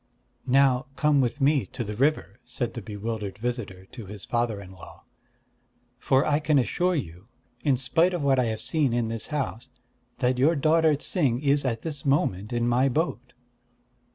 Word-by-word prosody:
"Now 130 Hz, -1 st, +3 dB
come 150 Hz, -2 st, +3 dB
with 125 Hz, +3 st, -1 dB
me 140 Hz, 0 st, +3 dB
to 120 Hz, -, -5 dB
the 105 Hz, -1 st, -5 dB
river," 130 Hz, -4 st, 0 dB
said 120 Hz, -1 st, -4 dB
the 120 Hz, -, -6 dB
bewildered 105 Hz, -1 st, -5 dB
visitor 105 Hz, -5 st, -4 dB
to 115 Hz, -6 st, -9 dB
his 100 Hz, 0 st, -9 dB
father 120 Hz, -3 st, -1 dB
in 95 Hz, -2 st, -11 dB
law. 95 Hz, -3 st, -14 dB, 1.0 s
"For 135 Hz, +2 st, +2 dB
I 150 Hz, 0 st, +2 dB
can 155 Hz, -1 st, +2 dB
assure 175 Hz, +7 st, +1 dB
you, 90 Hz, -, -6 dB, 0.4 s
in 135 Hz, -3 st, +2 dB
spite 165 Hz, +8 st, +2 dB
of 170 Hz, -, -3 dB
what 135 Hz, -2 st, +3 dB
I 125 Hz, -, +2 dB
have 110 Hz, -1 st, -3 dB
seen 145 Hz, -4 st, +1 dB
in 120 Hz, -2 st, 0 dB
this 115 Hz, -1 st, -2 dB
house, 135 Hz, -5 st, -4 dB, 0.5 s
that 125 Hz, -1 st, 0 dB
your 155 Hz, +6 st, +4 dB
daughter 155 Hz, +1 st, +3 dB
Ts'ing 140 Hz, -4 st, 0 dB
is 140 Hz, 0 st, +2 dB
at 115 Hz, -3 st, -2 dB
this 145 Hz, -4 st, -4 dB
moment 110 Hz, -8 st, 0 dB
in 120 Hz, 0 st, 0 dB
my 125 Hz, +3 st, +3 dB
boat." 130 Hz, -3 st, -2 dB
125 Hz, 180 wpm, -26 LUFS, 115-145 Hz, 1.0 s, your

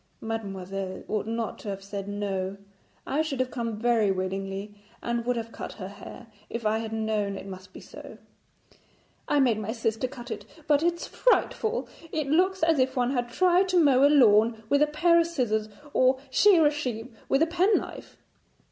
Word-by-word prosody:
'Mademoiselle 195 Hz, -4 st, -5 dB
ought 215 Hz, -1 st, -2 dB
not 230 Hz, -1 st, -3 dB
to 210 Hz, -, -7 dB
have 195 Hz, -1 st, -5 dB
said 200 Hz, 0 st, -6 dB
"no"; 200 Hz, -1 st, -3 dB, 0.5 s
I 290 Hz, +3 st, 0 dB
should 300 Hz, -4 st, -3 dB
have 255 Hz, 0 st, 0 dB
come 230 Hz, -4 st, -3 dB
very 230 Hz, -2 st, +2 dB
willingly 195 Hz, +2 st, -3 dB, 0.3 s
and 235 Hz, 0 st, -2 dB
would 250 Hz, -, +2 dB
have 230 Hz, -1 st, -5 dB
cut -, -, -7 dB
her 190 Hz, -3 st, -7 dB
hair, 205 Hz, +4 st, -11 dB, 0.2 s
if 230 Hz, -1 st, -5 dB
I 215 Hz, +1 st, +2 dB
had 225 Hz, -1 st, -5 dB
known 215 Hz, -3 st, -1 dB
it 190 Hz, -, -8 dB
must 185 Hz, -1 st, -10 dB
be -, -, -11 dB
so.' -, -, -11 dB, 1.1 s
'I 295 Hz, -, +2 dB
made 235 Hz, -5 st, +2 dB
my 215 Hz, 0 st, -3 dB
sister 225 Hz, +1 st, -1 dB
cut 245 Hz, -2 st, -10 dB
it, 210 Hz, -2 st, -5 dB, 0.2 s
but 290 Hz, -1 st, +3 dB
it's 340 Hz, +1 st, 0 dB
frightful. 475 Hz, -2 st, +1 dB, 0.2 s
It 310 Hz, -2 st, -1 dB
looks 370 Hz, +3 st, +2 dB
as 325 Hz, -3 st, +3 dB
if 260 Hz, +1 st, +1 dB
one 250 Hz, 0 st, +1 dB
had 245 Hz, -3 st, -1 dB
tried 365 Hz, +7 st, +3 dB
to 365 Hz, -1 st, +4 dB
mow 275 Hz, -4 st, +5 dB
a 285 Hz, -, +7 dB
lawn 225 Hz, -5 st, +4 dB
with 285 Hz, -, +3 dB
a 300 Hz, -, +5 dB
pair 335 Hz, +3 st, +3 dB
of 335 Hz, -, +2 dB
scissors, 220 Hz, -9 st, -1 dB, 0.2 s
or 255 Hz, +1 st, +4 dB
shear 350 Hz, +1 st, +5 dB
a 295 Hz, -, +5 dB
sheep 250 Hz, -5 st, -4 dB, 0.2 s
with 275 Hz, +4 st, +4 dB
a -, -, +2 dB
penknife.' 360 Hz, +5 st, 0 dB
235 Hz, 190 wpm, -27 LUFS, 210-295 Hz, 1.1 s, a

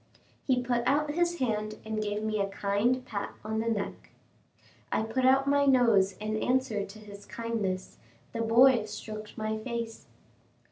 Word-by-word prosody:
He 250 Hz, -2 st, +2 dB
put 240 Hz, -1 st, +1 dB
out 295 Hz, +3 st, +2 dB
his 345 Hz, +2 st, +1 dB
hand 215 Hz, -5 st, -1 dB
and 220 Hz, 0 st, -2 dB
gave 210 Hz, 0 st, -2 dB
me 215 Hz, -1 st, -1 dB
a 195 Hz, -, +1 dB
kind 210 Hz, +6 st, 0 dB
pat 200 Hz, -4 st, -5 dB
on 220 Hz, 0 st, -1 dB
the 230 Hz, +1 st, 0 dB
neck. 210 Hz, -3 st, -3 dB, 0.8 s
I -, -, +1 dB
put 255 Hz, +4 st, 0 dB
out 270 Hz, +1 st, +5 dB
my 285 Hz, 0 st, +3 dB
nose 230 Hz, -7 st, +4 dB
in 215 Hz, +2 st, -3 dB
answer 245 Hz, -3 st, +1 dB
to 200 Hz, +2 st, -10 dB
his 205 Hz, -1 st, -12 dB
kindness; 215 Hz, -5 st, -3 dB, 0.3 s
the 230 Hz, -, -2 dB
boy 230 Hz, +1 st, +5 dB
stroked 215 Hz, 0 st, -8 dB
my 220 Hz, 0 st, -2 dB
face. 230 Hz, -1 st, -5 dB
220 Hz, 160 wpm, -29 LUFS, 210-255 Hz, 0.8 s, out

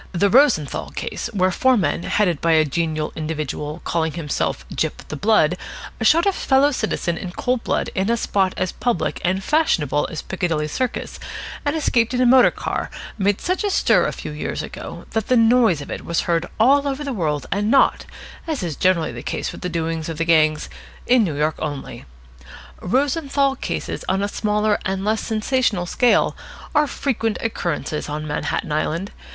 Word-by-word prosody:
The 195 Hz, +3 st, +2 dB
Rosenthal 245 Hz, -, +3 dB
case, -, -, -4 dB
where 185 Hz, -3 st, +2 dB
four 260 Hz, +6 st, +3 dB
men, 170 Hz, -5 st, 0 dB
headed 175 Hz, -5 st, +1 dB
by 165 Hz, 0 st, +3 dB
a 155 Hz, -1 st, +5 dB
genial 155 Hz, +1 st, -2 dB
individual 155 Hz, 0 st, -4 dB
calling 160 Hz, -2 st, -1 dB
himself 145 Hz, -, -2 dB
"Gyp -, -, -3 dB
the -, -, -4 dB
Blood" 180 Hz, -2 st, +3 dB, 0.4 s
shot 315 Hz, -, +4 dB
a 395 Hz, -, +4 dB
fellow 275 Hz, -3 st, +3 dB
citizen 195 Hz, -, -2 dB
in 180 Hz, -2 st, -6 dB
cold 250 Hz, -2 st, -1 dB
blood -, -, -1 dB
in 195 Hz, +2 st, 0 dB
a 235 Hz, -, +2 dB
spot 195 Hz, -4 st, 0 dB
as 185 Hz, -, -1 dB
public 245 Hz, -2 st, -1 dB
and 190 Hz, +2 st, 0 dB
fashionable 160 Hz, -, +1 dB
as 160 Hz, -, -6 dB
Piccadilly 165 Hz, -5 st, -1 dB
Circus 250 Hz, +10 st, -3 dB, 0.4 s
and 290 Hz, +2 st, 0 dB
escaped 245 Hz, -6 st, +1 dB
in 250 Hz, -, +1 dB
a -, -, +4 dB
motor 255 Hz, +1 st, +7 dB
car, -, -, -4 dB, 0.3 s
made 200 Hz, 0 st, +2 dB
such 365 Hz, +4 st, -1 dB
a 410 Hz, -, +1 dB
stir -, -, +3 dB
a -, -, -1 dB
few -, -, -7 dB
years -, -, -4 dB
ago -, -, -8 dB
that 220 Hz, -2 st, -1 dB
the 255 Hz, -, +4 dB
noise 225 Hz, -8 st, +4 dB
of 140 Hz, -, -8 dB
it -, -, -5 dB
was 170 Hz, -, 0 dB
heard 170 Hz, 0 st, 0 dB
all 280 Hz, +5 st, +4 dB
over 275 Hz, +1 st, -2 dB
the 280 Hz, -2 st, -3 dB
world 155 Hz, -8 st, -1 dB
and 205 Hz, +2 st, 0 dB
not, 270 Hz, +3 st, +3 dB, 0.4 s
as 305 Hz, -, -2 dB
is 165 Hz, -4 st, -3 dB
generally 175 Hz, -5 st, +2 dB
the 120 Hz, 0 st, -7 dB
case -, -, -3 dB
with -, -, -10 dB
the 180 Hz, -, -2 dB
doings 165 Hz, -1 st, -2 dB
of 165 Hz, -, -5 dB
the 165 Hz, -, 0 dB
gangs, 155 Hz, -2 st, +3 dB, 0.4 s
in 245 Hz, -2 st, +4 dB
New 160 Hz, -8 st, -2 dB
York 150 Hz, +1 st, 0 dB
only. 145 Hz, -3 st, -5 dB, 0.8 s
Rosenthal 275 Hz, -, +1 dB
cases -, -, -4 dB
on 190 Hz, +1 st, +1 dB
a -, -, +1 dB
smaller 210 Hz, 0 st, 0 dB
and 190 Hz, +1 st, -2 dB
less 215 Hz, +1 st, +1 dB
sensational 220 Hz, -4 st, 0 dB
scale 245 Hz, +7 st, +2 dB, 0.4 s
are 300 Hz, -1 st, +3 dB
frequent 225 Hz, -6 st, -1 dB
occurrences 170 Hz, -8 st, -2 dB
on 150 Hz, +1 st, -4 dB
Manhattan 150 Hz, +1 st, -2 dB
Island. 165 Hz, +5 st, -1 dB
190 Hz, 185 wpm, -21 LUFS, 160-245 Hz, 0.8 s, motor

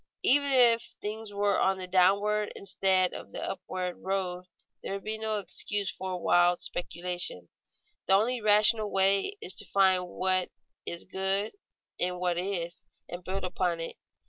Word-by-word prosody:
_ -, -, -50 dB, 0.2 s
Even 280 Hz, +1 st, +4 dB
if 235 Hz, -3 st, +4 dB
things 215 Hz, 0 st, -5 dB
were 205 Hz, 0 st, +1 dB
on 190 Hz, 0 st, +2 dB
the 185 Hz, -, -4 dB
downward 200 Hz, +3 st, +2 dB
instead 190 Hz, -1 st, +2 dB
of -, -, -9 dB
the -, -, -6 dB
upward 185 Hz, -2 st, -4 dB
road 185 Hz, -2 st, -3 dB, 0.4 s
there -, -, -5 dB
would 195 Hz, -1 st, -5 dB
be 220 Hz, 0 st, -4 dB
no 220 Hz, -1 st, -1 dB
excuse 200 Hz, +1 st, -2 dB
for 185 Hz, -1 st, -5 dB
wild 175 Hz, 0 st, +3 dB
speculation. 175 Hz, -, -4 dB, 0.6 s
The 190 Hz, -, +4 dB
only 235 Hz, +4 st, +1 dB
rational 210 Hz, +1 st, +4 dB
way 195 Hz, -, +2 dB
is 180 Hz, -, 0 dB
to -, -, +1 dB
find 190 Hz, -2 st, +3 dB
what 185 Hz, 0 st, 0 dB, 0.4 s
is 170 Hz, -, -2 dB
good 190 Hz, +2 st, -1 dB, 0.5 s
in 180 Hz, 0 st, 0 dB
what 175 Hz, -1 st, 0 dB
is, 175 Hz, -2 st, -4 dB, 0.3 s
and 175 Hz, +1 st, -7 dB
build 190 Hz, +2 st, -4 dB
upon 180 Hz, -2 st, -1 dB
it. 165 Hz, -, -5 dB
190 Hz, 160 wpm, -29 LUFS, 180-205 Hz, 0.6 s, Even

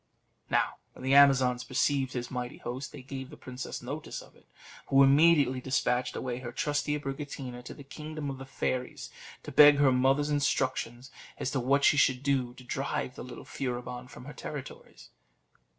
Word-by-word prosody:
Now, -, -, +1 dB, 0.2 s
when -, -, -12 dB
the 130 Hz, +1 st, +1 dB
Amazons 130 Hz, -3 st, +5 dB
perceived 130 Hz, +1 st, 0 dB
his 120 Hz, -1 st, -4 dB
mighty 125 Hz, -1 st, -4 dB
host, 130 Hz, +3 st, -6 dB
they 145 Hz, -4 st, -10 dB
gave 135 Hz, 0 st, -7 dB
the 150 Hz, -, -12 dB
princess 130 Hz, 0 st, -7 dB
notice -, -, -5 dB
of -, -, -15 dB
it, -, -, -24 dB, 0.4 s
who 135 Hz, 0 st, +6 dB
immediately 140 Hz, -2 st, +5 dB
despatched 125 Hz, -1 st, 0 dB
away 125 Hz, -1 st, -3 dB
her 125 Hz, -2 st, -6 dB
trusty 145 Hz, +3 st, -1 dB
Abricotina 135 Hz, -3 st, -6 dB
to -, -, -9 dB
the 140 Hz, -, -11 dB
kingdom 155 Hz, +1 st, -7 dB
of 135 Hz, -, -8 dB
the 135 Hz, -, -9 dB
fairies, 130 Hz, -1 st, -3 dB, 0.3 s
to -, -, -7 dB
beg 145 Hz, -1 st, +8 dB
her 140 Hz, -2 st, +4 dB
mother's 135 Hz, +3 st, +2 dB
instructions 130 Hz, -3 st, -1 dB, 0.3 s
as 135 Hz, -, -2 dB
to 135 Hz, -, 0 dB
what 140 Hz, +3 st, +2 dB
she 145 Hz, -, +5 dB
should 130 Hz, -2 st, +3 dB
do 130 Hz, -3 st, 0 dB
to 130 Hz, -, -13 dB
drive 125 Hz, -, -3 dB
the -, -, -8 dB
little -, -, -10 dB
Furibon 125 Hz, -1 st, -5 dB
from 125 Hz, -, -12 dB
her 145 Hz, -, -8 dB
territories. 145 Hz, -3 st, -9 dB
135 Hz, 180 wpm, -29 LUFS, 125-140 Hz, 0.4 s, beg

